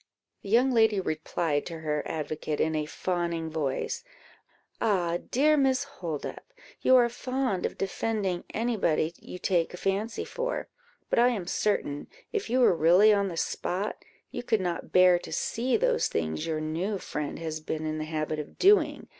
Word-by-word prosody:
The 200 - -9
young 245 +5 +4
lady 220 -4 +4
replied 155 -3 -1
to 165 -2 -7
her 150 -1 -1
advocate, 155 -1 -3
in 160 - +1
a 155 -1 -1
fawning 170 -1 -2
voice 155 - -2 0.8
"Ah, 175 -5 +1
dear 300 +4 +4
Miss 270 -2 +2
Holdup! 170 - -6 0.4
you 260 - +5
are 245 -2 +6
fond 255 -4 -1
of - - -11
defending 195 -2 -1
any 235 +2 0
body 160 -3 +1
you - - -9
take 180 -1 0
a - - -10
fancy 200 +5 -1
for; - - -3 0.4
but - - +3
I 240 - +6
am 220 -8 -1
certain, 170 -7 -1 0.3
if 425 -2 -2
you 255 +2 +2
were 235 - +5
really 180 +7 +6
on 200 -1 +2
the 170 -3 -5
spot, 190 +4 -2 0.3
you - - -4
could 230 -3 +1
not 175 -2 -3
bear 180 -1 +6
to - - -10
see 245 +2 0
those - - +2
things 80 -1 -2
your 160 -1 -1
new 165 +7 -2
friend 150 -5 -4
has 160 -1 -4
been 155 0 -4
in 155 0 -2
the 155 - -3
habit 155 -1 -2
of 150 - -8
doing. 400 +2 +4
180 Hz, 175 wpm, -28 LUFS, 155-230 Hz, 0.8 s, are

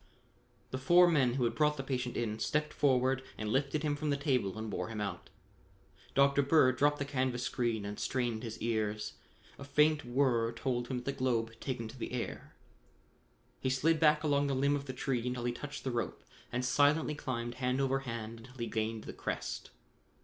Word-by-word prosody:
The 130 - -3
four 175 +7 +6
men 135 -7 +3
who 130 - +1
had 115 -1 +1
brought 150 +4 +2
the 135 - -3
patient 125 -2 -2
in 110 -2 -2
stepped 150 +4 0
forward 130 -2 +2 0.2
and 110 -1 -3
lifted 140 +3 0
him 150 -1 +1
from 150 +1 -2
the 140 - +2
table 125 -8 0
and 110 0 -4
bore - - -3
him 110 -1 -5
out. 100 -4 -4 0.9
Dr. 140 +1 +5
Bird 135 -2 +4
dropped 145 +2 +3
the 140 - -2
canvas 130 -3 -1
screen 115 -4 -1
and 105 0 -5
strained 120 -4 -1
his 115 -2 -6
ears. 110 -2 -1 0.5
A - - -7
faint 150 +1 +3
whir 120 -2 +1
told 120 0 -2
him 130 - -2
that 125 - -6
the 140 - 0
globe 120 -4 0
had 115 0 -19
taken 120 -4 -3
to 120 +4 -11
the - - -4
air. 125 - -5 1.0
He 130 - 0
slid 155 +5 +2
back 150 -1 +4
along 145 -1 +2
the 135 - 0
limb 140 +2 +2
of 140 -1 -4
the 130 - -5
tree 125 -2 -1
until 125 -1 -2
he 120 - 0
touched 145 +4 -7
the 130 - -1
rope 120 -1 -3 0.3
and 125 +1 -1
silently 145 +4 +3
climbed 120 -5 -3
hand 125 +1 +1
over 135 0 +2
hand 115 -3 -6
until 125 +3 -14
he 115 - -2
gained 110 -1 -2
the - - -7
crest. - - -4
130 Hz, 205 wpm, -33 LUFS, 115-140 Hz, 1.0 s, four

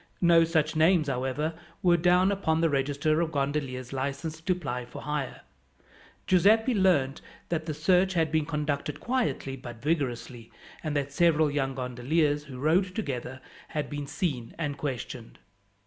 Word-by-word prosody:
No 170 -2 +6
such 160 -1 +1
names, 160 0 +4
however, 135 +5 -1 0.3
were 175 -1 +5
down 180 +3 +4
upon 160 -5 0
the 165 -1 +2
register 145 +3 +1
of 165 -1 -1
gondoliers 135 -3 -2
licensed 140 +4 -4
to 185 - +3
ply 125 -8 -4
for 120 - -10
hire. 150 -3 -3 0.8
Giuseppi 220 +7 +4
learned 175 - +2 0.3
that 165 -1 -2
the 155 - -2
search 180 +4 +3
had 160 -2 +2
been 155 -2 +1
conducted 150 -2 -2
quietly 235 - -1
but 120 -3 -9
vigorously, 125 -5 -2 0.3
and 155 -2 -2
that 140 0 -2
several 160 -2 +3
young 135 -2 -1
gondoliers 145 +4 0
who 135 -3 -9
rowed 175 +7 +2
together 130 - -4 0.3
had 150 -2 -4
been 145 -1 -4
seen 135 -9 -3
and 145 -4 -2
questioned. 125 -4 -5
150 Hz, 150 wpm, -28 LUFS, 135-170 Hz, 0.8 s, No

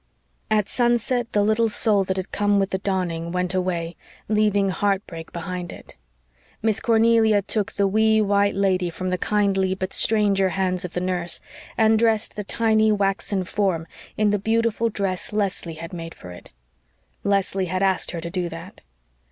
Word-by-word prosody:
At 215 -2 +2
sunset 240 0 +1
the 205 - +2
little 220 +2 +2
soul 210 -1 +3
that 190 0 -2
had 190 0 -4
come 205 0 +2
with 195 0 0
the 190 - -1
dawning 175 -4 -2
went 180 +1 -1
away, 175 -2 -2 0.3
leaving 210 -2 +2
heartbreak 190 -4 -2
behind 175 +1 -5
it. - - -12 0.7
Miss 220 -1 +2
Cornelia 225 -2 +3
took 205 0 -2
the 200 - +1
wee, 220 +2 +3
white 200 -1 +2
lady 185 -2 +1
from 185 +2 -4
the 180 - -1
kindly 195 -2 +1
but 190 0 -4
stranger 200 -3 +2
hands 185 0 -1
of 180 - -6
the 180 - -2
nurse, 180 -1 -2 0.4
and 220 -1 +4
dressed 225 -1 +1
the 210 - -4
tiny 220 +1 +2
waxen 195 -1 0
form 185 -3 -1 0.3
in 215 -1 +3
the 205 - +1
beautiful 230 +2 +1
dress 195 -4 -3
Leslie 195 -5 -2
had 165 +2 -8
made 165 -1 -7
for 90 - -11
it. 90 - -12 0.7
Leslie 195 -1 0
had 185 +2 -1
asked 190 -1 +1
her 170 - -4
to 170 +1 -6
do 180 -2 -2
that. 165 +3 -10
195 Hz, 170 wpm, -23 LUFS, 180-215 Hz, 0.7 s, and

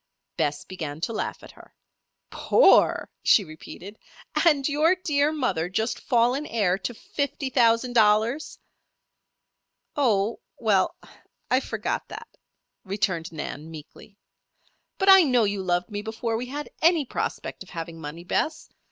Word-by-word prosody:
Bess 145 0 -1
began 155 -5 -6
to 230 - -2
laugh - - -4
at - - -12
her. - - -18 0.6
"Poor?" - - +4
she 210 - +5
repeated. 180 +5 -11 0.5
"And 285 -4 +3
your 310 +5 +3
dear 300 -5 +1
mother 195 - -1
just 220 +5 -2
fallen 250 +4 +1
heir 195 -5 0
to 240 +5 -5
fifty 275 +2 -4
thousand 240 0 +3
dollars?" 225 +5 +2 1.4
"Oh 225 -6 +1 0.2
well 205 -5 +1 0.6
I - - +5
forgot - - -3
that," - - -10 0.5
returned 190 -4 -2
Nan, 155 0 -6
meekly. 165 +6 -13 0.8
"But 390 0 +2
I 385 0 +10
know 250 -7 +3
you 200 -1 -1
loved 180 0 -1
me 205 0 -3
before 225 +1 -3
we 245 +3 -3
had 290 +3 -6
any 330 -3 +4
prospect - - -4
of 190 - -10
having 165 -1 -7
money, 160 +3 -7
Bess. 310 - -2
220 Hz, 135 wpm, -25 LUFS, 180-275 Hz, 1.4 s, I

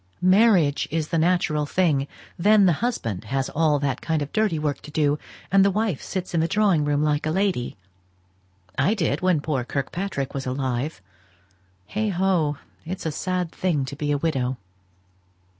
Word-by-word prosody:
Marriage 190 -9 +4
is 155 0 -2
the 165 - +1
natural 155 -3 +1
thing; 150 -6 +1 0.3
then 205 +3 +5
the 175 - +5
husband 115 - -2
has 135 +3 -1
all 155 -1 +2
that 135 -3 -2
kind 160 -2 0
of 145 - -9
dirty 215 -6 +1
work 150 -2 -2
to - - -11
do, 150 -1 +1 0.3
and 195 0 +6
his 200 -1 +2
wife 215 -9 0
sits 185 -2 -5
in 170 - +2
the 165 - +2
drawing 195 -4 +2
room 145 0 +1
like 150 0 +1
a - - +1
lady. 185 -7 -1 1.0
I 175 +11 +3
did, 160 -7 0
when 180 -5 +2
poor 145 -5 -1
Kirkpatrick 140 +3 -3
was 135 -1 -4
alive. 130 - -2 0.8
Heigho! 190 - 0 0.3
it's 175 +2 -6
a 160 - 0
sad 180 +2 -2
thing 160 -7 0
to 135 - -7
be 145 0 -2
a 145 - +2
widow." 130 -5 -1
155 Hz, 170 wpm, -24 LUFS, 145-185 Hz, 1.0 s, and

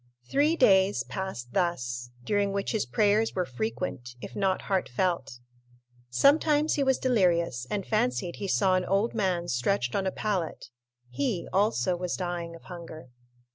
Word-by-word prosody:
Three 295 +4 +3
days 195 -8 +4
passed 190 -11 -6
thus, 125 -10 -1
during 205 +5 +1
which 195 0 -2
his 220 - -1
prayers 210 - +2
were 180 -1 0
frequent, 120 0 -4
if - - -9
not 195 -2 0
heartfelt. 175 -6 -1 0.7
Sometimes 295 - +4
he 285 - +1
was 265 -1 +3
delirious, 170 - +1
and 200 -3 -2
fancied 170 - 0
he 200 - -4
saw 190 0 +3
an 185 0 +1
old 200 +4 +1
man 185 -5 0
stretched 125 0 0
on 195 -1 0
a - - 0
pallet; 185 - -3 0.4
he, 140 +7 -2
also, 195 -2 +2
was 180 0 -3
dying 175 -2 -4
of 165 - -14
hunger. 165 -6 -10
185 Hz, 150 wpm, -28 LUFS, 155-205 Hz, 0.7 s, days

